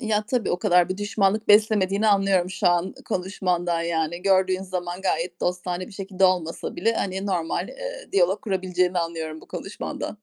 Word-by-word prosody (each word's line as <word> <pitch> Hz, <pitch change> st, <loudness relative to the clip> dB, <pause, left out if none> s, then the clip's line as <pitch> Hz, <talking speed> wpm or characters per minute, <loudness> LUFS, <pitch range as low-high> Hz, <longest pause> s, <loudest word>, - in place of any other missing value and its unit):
Ya, 215 Hz, -3 st, 0 dB
tabii, 240 Hz, -2 st, 0 dB
o 175 Hz, -, 0 dB
kadar 180 Hz, -4 st, +4 dB
bir 185 Hz, -, -2 dB
düşmanlık 205 Hz, +1 st, 0 dB
beslemediğini 210 Hz, -1 st, +4 dB
anlıyorum 195 Hz, -3 st, +3 dB
şu 185 Hz, +1 st, -1 dB
an 175 Hz, +2 st, +1 dB
konuşmandan 180 Hz, -2 st, -1 dB
yani. 170 Hz, 0 st, -2 dB
Gördüğün 190 Hz, -1 st, +2 dB
zaman 180 Hz, -1 st, -4 dB
gayet 175 Hz, -1 st, -1 dB
dostane 180 Hz, 0 st, -2 dB
bir 220 Hz, -, -13 dB
şekilde 195 Hz, -1 st, -1 dB
olmasa 180 Hz, -3 st, 0 dB
bile, 230 Hz, -, +2 dB
hani, 190 Hz, -1 st, -2 dB
normal, 175 Hz, -4 st, -1 dB
eee, -, -, -7 dB
diyalog 190 Hz, +1 st, +3 dB
kurabileceğini 185 Hz, -2 st, 0 dB
anlıyorum 160 Hz, -2 st, -4 dB
bu -, -, -16 dB
konuşmandan. -, -, -5 dB
185 Hz, 165 wpm, -24 LUFS, 175-200 Hz, -, kadar